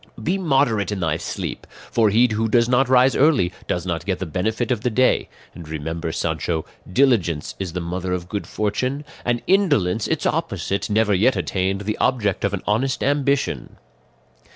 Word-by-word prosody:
"Be 185 +4 0
moderate 130 - +1
in 100 - -3
thy 80 -3 0
sleep; 85 - -5 0.2
for 115 -2 +3
he 115 +5 +4
who 110 +1 0
does 115 +1 +3
not 125 +1 +2
rise 130 0 +5
early 130 - +3
does 90 0 -2
not 85 -3 -2
get 95 -3 -1
the 95 - -4
benefit 110 +9 -1
of 120 -4 0
the 125 - +1
day; 130 +3 +2 0.2
and 85 -3 -11
remember, 80 +2 -4
Sancho, 80 0 -2 0.3
diligence 95 - +2
is 95 -4 -4
the 90 - -3
mother 90 +2 -3
of 90 -1 -3
good 100 +2 -4
fortune, 125 +7 -2 0.2
and 120 -1 -1
indolence, 145 - +2
its - - -1
opposite, 100 +3 -1
never 105 0 +2
yet 110 +7 +3
attained 95 +1 -1
the 105 +1 -3
object 105 -7 +1
of 100 - +1
an 90 - -8
honest 125 +5 0
ambition. 140 0 0
105 Hz, 175 wpm, -22 LUFS, 90-125 Hz, 0.3 s, rise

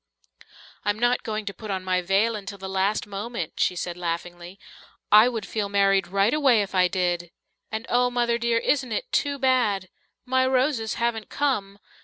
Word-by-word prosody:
"I'm 205 0 0
not 240 +2 +2
going 215 -1 -4
to 200 - -4
put 215 +1 -10
on 190 -1 -2
my 185 -1 +1
veil 195 +5 +2
until 200 -1 -7
the 190 0 -7
last 190 +2 0
moment," 205 -3 -5
she 180 - +2
said 175 0 -4
laughingly. 175 +1 -5 0.5
"I 215 +4 +8
would 225 -4 -4
feel 210 -2 -3
married 195 -2 +3
right 200 +5 +2
away 265 -8 +4
if 195 - -9
I 185 -1 +4
did. 175 -2 -1 0.4
And 220 +1 -4
oh, 245 0 +2
Mother 240 -1 0
dear, 235 0 +1
isn't 255 +1 0
it 215 - -3
too 285 -1 0
bad? 245 -8 +1 0.4
My 260 0 +2
roses 255 -3 +1
haven't 235 -2 -2
come. 230 -9 -1
210 Hz, 180 wpm, -25 LUFS, 190-240 Hz, 0.5 s, I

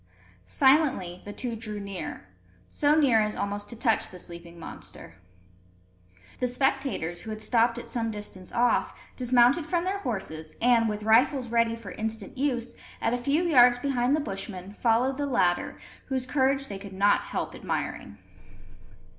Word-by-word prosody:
Silently 265 - +3
the 205 - -6
two 235 +2 -4
drew 215 -2 -5
near 195 - -6 0.4
so 295 +1 +2
near 265 -8 +4
as 210 0 -1
almost 205 0 -3
to 235 - -8
touch 225 -1 +1
the 185 - -11
sleeping 170 -1 -10
monster. 165 - -10 1.3
The 250 - +1
spectators, 250 - -1
who 225 - -8
had 215 0 -5
stopped 230 +1 +2
at - - -7
some 230 -2 -2
distance 205 -4 -7
off, 240 +1 +1 0.2
dismounted 250 +5 +3
from 345 -1 0
their 385 +2 -1
horses, 190 - -4
and, 235 -2 +4
with 210 0 -4
rifles 245 +3 +3
ready 230 0 +2
for 225 -5 -9
instant 220 -1 -5
use, 250 -3 -1 0.3
at - - 0
a - - +1
few 285 +7 +1
yards 250 -7 +6
behind 255 0 +1
the - - 0
Bushmen, 195 -4 -6
followed 245 +4 +1
the 290 0 -1
latter, 185 -9 +1 0.3
whose 260 -2 -2
courage 270 0 +1
they 200 -6 -6
could 195 -1 -10
not 200 +2 +3
help - - -4
admiring. 100 - -4
230 Hz, 160 wpm, -27 LUFS, 205-265 Hz, 1.3 s, yards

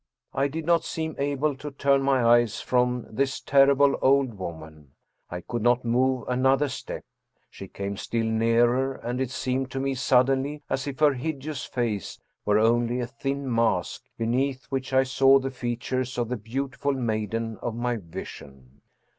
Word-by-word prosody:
I 140 - +1
did 155 +3 -5
not 170 0 +3
seem 160 -1 -4
able 140 +1 0
to 150 +2 -6
turn 140 0 +2
my 135 -2 +2
eyes 120 -2 +4
from 125 -1 0
this 135 +4 -1
terrible 140 0 +4
old 135 -2 +3
woman, 80 -6 -9 0.4
I 90 0 -5
could 120 +5 -4
not 120 +2 +2
move 125 +1 +1
another 130 +3 +2
step. 125 - -6 0.5
She - - -9
came 100 0 -5
still 115 +2 -2
nearer, 120 +4 +2
and 125 +2 -4
it 130 - -1
seemed 130 0 -2
to 135 - -4
me 135 0 0
suddenly 135 +3 +2
as 135 - -1
if 140 +1 -6
her 150 -2 +6
hideous 140 0 -4
face 115 -6 -3 0.3
were 105 0 +3
only 120 +2 +2
a 120 - -1
thin 135 +1 -3
mask, 115 0 0 0.2
beneath 130 +4 -1
which 135 -1 -3
I 130 0 +4
saw 135 +1 +5
the 135 0 -2
features 125 +1 -3
of 120 -2 -1
the 125 - -1
beautiful 135 +5 -3
maiden 115 -2 -2
of 120 -2 -3
my 120 0 -1
vision. 70 - -10
125 Hz, 165 wpm, -26 LUFS, 115-135 Hz, 0.5 s, her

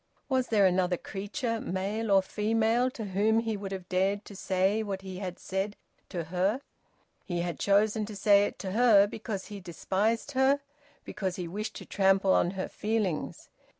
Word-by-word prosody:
Was 260 -2 +1
there 210 -3 +4
another 180 -1 +2
creature, 225 - -3
male 205 +4 -2
or 195 -1 +5
female, 225 +4 +1
to 230 -4 -6
whom 205 +3 +2
he 225 -1 0
would 200 -1 -6
have 190 -2 -6
dared 195 +3 0
to 200 - -11
say 190 +2 +1
what 195 -3 -4
he 190 -1 -7
had 185 -2 -5
said 195 +2 -3 0.3
to 175 -3 -3
her? 185 - 0 0.6
He 175 -2 -2
had 175 -1 -3
chosen 210 +1 +2
to 215 - -7
say 200 0 +5
it - - -9
to 190 - -5
her 215 -2 +6
because 205 -1 -5
he 205 -2 -8
despised 195 - -1
her, 270 +1 +3 0.5
because 190 -4 -3
he 180 -2 -4
wished 210 +5 -5
to - - -8
trample 195 -1 +3
on - - +3
her 190 - -2
feelings. 210 -6 -2
200 Hz, 180 wpm, -29 LUFS, 190-220 Hz, 0.6 s, her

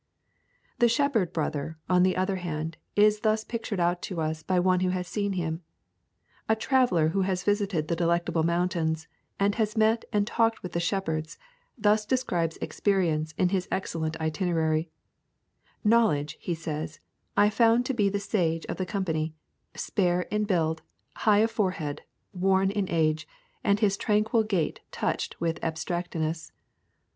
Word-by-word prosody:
The 240 -1 +5
shepherd 235 - +2
brother, 155 0 -3
on 180 0 +4
the 185 0 +3
other 190 +1 0
hand, 160 -2 -4 0.2
is 210 0 +5
thus 215 0 +1
pictured 225 -4 -4
out 175 +1 +1
to 180 -4 -4
us 155 0 -2
by 185 +3 +1
one 180 0 +3
who 185 0 +1
has 180 -1 -2
seen 200 +1 -1
him. 165 -2 -2 0.9
A 220 - +5
traveller 220 - +2
who 195 +4 0
has 185 -1 0
visited 200 -6 0
the 170 - 0
Delectable 170 -1 +1
Mountains, 165 -1 0 0.3
and 200 +1 +3
has 215 +1 -1
met 220 +1 +3
and 205 -2 +2
talked 225 +1 +1
with 180 - -5
the 170 - -1
shepherds, 165 -4 -2 0.4
thus 215 -1 +3
describes 195 -9 0
Experience 160 -6 0
in 180 - +3
his 185 -1 -1
excellent 165 -4 -2
itinerary: 160 -1 0 0.9
'Knowledge,' 210 -10 +3
he 175 - -2
says, 155 -1 -5 0.4
'I 205 +1 +5
found 230 +2 +4
to 265 - -1
be 205 -5 +2
the 200 +1 -1
sage 175 -6 0
of - - -4
the 185 - -2
company, 160 -5 -2 0.4
spare 180 -3 +1
in 210 0 +1
build, 160 -5 0 0.4
high 210 -1 +4
of 225 - -3
forehead, 185 -9 -1 0.3
worn 190 +1 +2
in 200 -2 -1
age, 160 -1 +1 0.4
and 200 +1 +3
his 200 -2 +3
tranquil 215 +2 +2
gait 195 -7 -1
touched - - -2
with 165 -1 -2
abstractedness. 165 -1 -3
180 Hz, 155 wpm, -27 LUFS, 160-210 Hz, 0.9 s, The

